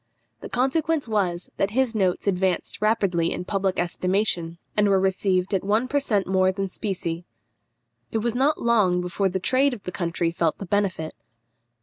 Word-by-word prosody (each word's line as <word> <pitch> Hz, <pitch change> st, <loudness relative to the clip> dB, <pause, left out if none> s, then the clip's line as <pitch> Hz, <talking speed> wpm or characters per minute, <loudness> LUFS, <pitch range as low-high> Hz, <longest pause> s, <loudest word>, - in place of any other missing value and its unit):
The -, -, -8 dB
consequence 290 Hz, +4 st, 0 dB
was, 185 Hz, -5 st, -1 dB
that 195 Hz, -, +1 dB
his 260 Hz, -3 st, +2 dB
notes 190 Hz, -5 st, 0 dB
advanced 190 Hz, -2 st, 0 dB
rapidly 195 Hz, -6 st, +2 dB
in 180 Hz, -, -4 dB
public 195 Hz, -1 st, -1 dB
estimation, 175 Hz, -1 st, 0 dB, 0.2 s
and 210 Hz, -1 st, +3 dB
were 195 Hz, -1 st, +4 dB
received 190 Hz, 0 st, +1 dB
at 190 Hz, -, +1 dB
one 215 Hz, +5 st, +1 dB
per 285 Hz, +2 st, +1 dB
cent 210 Hz, -8 st, 0 dB
more 185 Hz, 0 st, +3 dB
than 195 Hz, +1 st, -2 dB
specie. 180 Hz, -4 st, -3 dB, 0.9 s
It -, -, 0 dB
was 230 Hz, +1 st, 0 dB
not 280 Hz, +4 st, +2 dB
long 205 Hz, -7 st, +3 dB
before 185 Hz, +2 st, 0 dB
the 190 Hz, +1 st, -2 dB
trade 260 Hz, +6 st, +2 dB
of 205 Hz, -, -14 dB
the 180 Hz, -, -5 dB
country 170 Hz, -1 st, -1 dB
felt 165 Hz, -2 st, 0 dB
the 200 Hz, -, -6 dB
benefit. 185 Hz, -4 st, -1 dB
195 Hz, 170 wpm, -24 LUFS, 180-220 Hz, 0.9 s, were